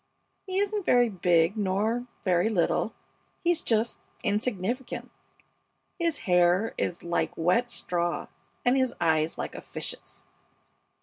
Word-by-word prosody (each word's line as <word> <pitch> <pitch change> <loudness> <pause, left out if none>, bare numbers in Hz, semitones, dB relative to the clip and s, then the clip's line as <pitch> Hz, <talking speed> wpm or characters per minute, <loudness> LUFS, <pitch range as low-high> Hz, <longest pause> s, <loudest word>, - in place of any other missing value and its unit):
He 375 0 -2
isn't 410 +1 0
very 245 -7 +4
big 175 -2 +3
nor 215 +4 0 0.2
very 180 +2 +3
little; 205 +2 +1 0.5
he's 345 -1 +2
just 225 0 0 0.2
insignificant. 215 +3 -2 0.9
His 335 -3 +1
hair 180 +4 +3
is 175 - -2
like 170 0 -1
wet 180 +9 +2
straw, 175 -6 -1 0.4
and 245 +2 +5
his 260 -2 +1
eyes 160 -1 +2
like - - -4
a - - -7
fish's. - - -6
210 Hz, 120 wpm, -28 LUFS, 175-245 Hz, 0.9 s, and